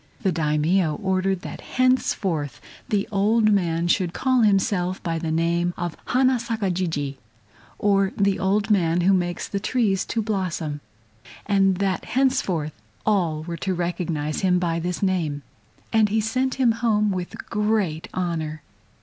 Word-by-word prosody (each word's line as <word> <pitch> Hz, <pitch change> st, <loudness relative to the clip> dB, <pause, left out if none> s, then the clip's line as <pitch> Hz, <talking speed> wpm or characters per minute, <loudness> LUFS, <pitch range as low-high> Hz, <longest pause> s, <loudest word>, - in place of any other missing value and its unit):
The 190 Hz, -, +2 dB
Daimio 155 Hz, +1 st, +1 dB
ordered 190 Hz, +1 st, 0 dB
that -, -, -7 dB
henceforth 190 Hz, -, 0 dB, 0.3 s
the 205 Hz, -4 st, 0 dB
old 215 Hz, +2 st, +3 dB
man 170 Hz, -4 st, +1 dB
should 175 Hz, 0 st, +1 dB
call 255 Hz, +1 st, +2 dB
himself 195 Hz, -3 st, +2 dB
by 165 Hz, -2 st, -1 dB
the 160 Hz, -1 st, -3 dB
name 170 Hz, +2 st, +1 dB
of 175 Hz, -2 st, -3 dB
Hana 255 Hz, 0 st, +3 dB
Saka 225 Hz, -4 st, -2 dB
Jijii, 160 Hz, -6 st, -2 dB, 0.6 s
or 195 Hz, -1 st, +2 dB
"The 200 Hz, -1 st, +2 dB
Old 200 Hz, +3 st, +1 dB
Man 175 Hz, -3 st, +3 dB
who 190 Hz, +3 st, +4 dB
makes 175 Hz, -2 st, -1 dB
the 200 Hz, -, -3 dB
Trees 205 Hz, -4 st, +1 dB
to 225 Hz, -, -2 dB
Blossom," 180 Hz, -8 st, -2 dB, 0.6 s
and 195 Hz, -2 st, +3 dB
that 195 Hz, -1 st, -1 dB
henceforth 185 Hz, -, 0 dB, 0.3 s
all 170 Hz, -7 st, +1 dB
were 170 Hz, +1 st, -5 dB
to 190 Hz, +3 st, -2 dB
recognize 170 Hz, -4 st, -2 dB
him 180 Hz, -1 st, +3 dB
by 170 Hz, -2 st, 0 dB
this 180 Hz, +3 st, -3 dB
name, 165 Hz, -7 st, 0 dB, 0.5 s
and 220 Hz, -2 st, +4 dB
he 220 Hz, +2 st, +1 dB
sent 255 Hz, +4 st, 0 dB
him 255 Hz, -3 st, +3 dB
home 215 Hz, -3 st, +1 dB
with 180 Hz, -2 st, -4 dB
great 210 Hz, -7 st, 0 dB
honor. 160 Hz, -4 st, -3 dB
185 Hz, 150 wpm, -23 LUFS, 170-210 Hz, 0.6 s, who